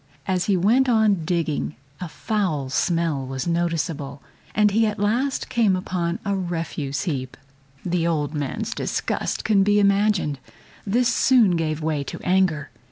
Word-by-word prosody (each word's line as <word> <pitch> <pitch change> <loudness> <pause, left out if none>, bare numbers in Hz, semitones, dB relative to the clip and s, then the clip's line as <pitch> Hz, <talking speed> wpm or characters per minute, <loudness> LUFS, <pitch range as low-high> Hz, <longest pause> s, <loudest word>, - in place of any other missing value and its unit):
As 185 -2 0
he 195 -1 +2
went 240 +9 +3
on 215 -7 +3
digging 160 -3 -1 0.2
a 180 - -5
foul 165 -10 -2
smell 165 -4 0
was 130 0 -4
noticeable, 165 -4 -2 0.4
and 210 0 +4
he 220 +2 +3
at 210 - -3
last 240 +7 0
came 220 -6 +2
upon 180 -2 -2
a 200 0 0
refuse 165 -6 -3
heap. 135 -8 -4 0.5
The 175 -2 0
old 150 -3 -1
man's 145 -3 -3
disgust - - -2
can 210 -3 +4
be 205 +1 +3
imagined. 200 -7 +2 0.5
This 240 +5 +2
soon 235 -10 +4
gave 155 -1 -2
way 155 -2 -1
to - - -6
anger. 180 -6 +1
175 Hz, 150 wpm, -23 LUFS, 155-205 Hz, 0.5 s, and